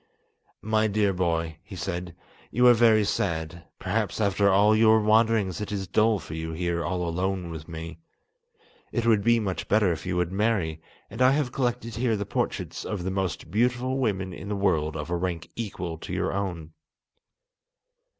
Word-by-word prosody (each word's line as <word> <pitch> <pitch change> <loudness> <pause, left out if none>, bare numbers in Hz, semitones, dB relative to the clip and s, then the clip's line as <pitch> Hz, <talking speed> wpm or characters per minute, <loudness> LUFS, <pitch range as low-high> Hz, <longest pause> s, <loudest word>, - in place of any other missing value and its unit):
"My 110 +1 +2
dear 105 -1 +1
boy," 85 -3 -1
he 100 -1 -11
said, 90 -1 -4 0.3
"you 125 +3 +2
are 125 - +9
very 110 -2 +5
sad; 85 -4 -2
perhaps 105 +3 -2
after 100 -1 +3
all 105 +3 +5
your 110 0 +5
wanderings 110 -3 +2
it 105 - -4
is 100 -2 -2
dull 110 +3 +3
for 85 -4 -9
you 80 0 -4
here 85 0 -1
all 90 -1 -2
alone 90 +1 -2
with 80 -1 -8
me. 80 0 -7 0.9
It 120 -2 -1
would 110 -3 +4
be 115 +1 +4
much 95 -4 -3
better 105 -3 +3
if 85 +2 -5
you 90 -1 -1
would 90 0 0
marry, 95 -6 0 0.3
and 115 +4 -5
I 130 +1 +6
have 140 -4 0
collected 120 -3 -2
here 115 -2 +1
the 100 - -3
portraits - - -3
of 100 -4 -4
the 95 - -2
most 95 -3 -3
beautiful 125 +4 +1
women 95 -7 -1
in 100 - -8
the 105 - -1
world 80 -6 +1
of 75 +3 -5
a - - +1
rank 85 -2 -3
equal 90 -7 -5
to - - -8
your - - -1
own. 85 -5 -4
95 Hz, 180 wpm, -26 LUFS, 85-110 Hz, 0.9 s, are